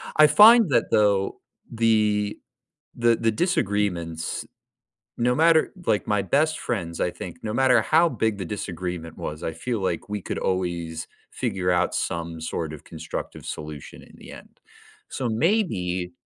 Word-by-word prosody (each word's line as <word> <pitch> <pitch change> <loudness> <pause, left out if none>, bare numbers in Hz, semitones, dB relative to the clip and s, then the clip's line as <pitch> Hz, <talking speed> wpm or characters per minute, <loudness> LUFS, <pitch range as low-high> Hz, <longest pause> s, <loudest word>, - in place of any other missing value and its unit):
I 155 0 +7
find 220 -1 +7
that - - +3
though, 100 -2 +2 0.3
the 105 -3 +1 0.6
the 120 -1 +3
the 115 0 +1
disagreements, 100 - -1 0.7
no 125 +1 +1
matter 160 +2 +4
like, 105 - +1
my 105 -2 +1
best 155 +10 +1
friends, 85 -7 -4
I 90 - +1
think 85 - -9
no 110 -1 -3
matter 125 -2 +4
how 165 +8 +4
big 110 -8 -1
the 95 - -4
disagreement 90 -3 -5
was, 75 0 -6
I 80 - -3
feel 110 +7 -3
like 95 0 -2
we 105 -2 -4
could - - -4
always 85 -3 -2 0.2
figure 90 -1 -2
out 90 0 +1
some 85 -1 -3
sort 80 -1 -4
of 75 - -10
constructive - - -7
solution 75 -2 -8
in - - -17
the - - -12
end. - - -14 0.5
So 125 -3 -3
maybe 110 - 0
105 Hz, 150 wpm, -24 LUFS, 85-120 Hz, 0.7 s, I